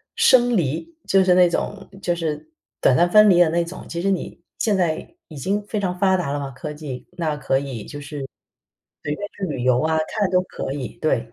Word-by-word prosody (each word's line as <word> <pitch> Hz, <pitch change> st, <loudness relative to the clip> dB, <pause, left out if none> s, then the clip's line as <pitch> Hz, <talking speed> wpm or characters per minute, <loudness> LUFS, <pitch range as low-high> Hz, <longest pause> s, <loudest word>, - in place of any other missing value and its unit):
生 245 Hz, -3 st, +5 dB
离， 170 Hz, -, -2 dB
就 195 Hz, -1 st, +5 dB
是 180 Hz, -1 st, +4 dB
那 180 Hz, -1 st, +6 dB
种 195 Hz, +3 st, -3 dB
就 175 Hz, -2 st, 0 dB
是 155 Hz, -2 st, -4 dB, 0.3 s
短 125 Hz, -, +4 dB
暂 175 Hz, -, +4 dB
分 210 Hz, -1 st, +7 dB
离 175 Hz, -, +5 dB
的 175 Hz, -2 st, +6 dB
那 170 Hz, +1 st, +1 dB
种， 175 Hz, +2 st, -9 dB
其 170 Hz, -, -4 dB
实 195 Hz, -, +1 dB
你 185 Hz, -2 st, -3 dB, 0.2 s
现 210 Hz, -3 st, +1 dB
在 170 Hz, -4 st, -1 dB
已 155 Hz, -, -11 dB
经 200 Hz, +9 st, -1 dB
非 210 Hz, -, -2 dB
常 180 Hz, -2 st, -1 dB
发 190 Hz, -1 st, +4 dB
达 160 Hz, -6 st, -2 dB
了 145 Hz, -, -1 dB
嘛， 140 Hz, -1 st, -4 dB
科 150 Hz, +3 st, -7 dB
技， 145 Hz, -4 st, -7 dB
那 160 Hz, -4 st, -2 dB
可 135 Hz, -2 st, +1 dB
以 130 Hz, -6 st, -6 dB
就 145 Hz, -1 st, -8 dB
是， 140 Hz, -, -10 dB, 0.9 s
随 150 Hz, -, -2 dB
便 205 Hz, -, -4 dB
去 195 Hz, -, -2 dB
旅 140 Hz, -8 st, -3 dB
游 125 Hz, 0 st, +3 dB
啊， 160 Hz, 0 st, +1 dB
看 205 Hz, -4 st, -1 dB
都 180 Hz, 0 st, +3 dB
可 155 Hz, -, -6 dB
以， 135 Hz, -4 st, -6 dB
对。 115 Hz, -7 st, 0 dB
170 Hz, 245 characters per minute, -22 LUFS, 145-190 Hz, 0.9 s, 分